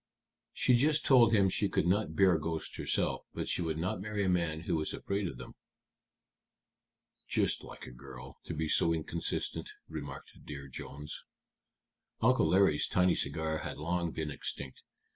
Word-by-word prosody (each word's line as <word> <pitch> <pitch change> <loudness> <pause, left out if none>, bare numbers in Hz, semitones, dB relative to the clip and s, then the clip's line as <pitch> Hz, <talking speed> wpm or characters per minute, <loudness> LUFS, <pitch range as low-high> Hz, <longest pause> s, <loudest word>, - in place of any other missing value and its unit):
"She 125 - +3
just 150 +5 +3
told 125 -5 +7
him 100 -3 +5
she 100 +2 +1
could - - +1
not 90 -3 +1
bear 95 -3 +5
ghosts 80 +1 -3
herself, - - 0
but - - -3
she - - 0
would 80 -2 -1
not 90 +2 -2
marry 105 0 -2
a - - +2
man 85 -3 0
who 85 - -1
was 75 -1 -1
afraid 100 0 -2
of 65 - -6
them." - - -9 1.7
"Just - - +1
like - - -10
a - - -9
girl 65 +1 -11
to 85 - -5
be 80 +1 -1
so 85 +2 +3
inconsistent," 80 +1 -3 0.2
remarked 70 -4 -7
Dear 70 -1 -7
Jones. 70 +2 -7 1.0
Uncle 130 +3 +4
Larry's 95 -6 +4
tiny 90 0 +3
cigar 80 +2 -1
had - - -5
long 85 +2 -1
been 80 -2 -4
extinct. 70 -1 -6
80 Hz, 160 wpm, -32 LUFS, 75-95 Hz, 1.7 s, told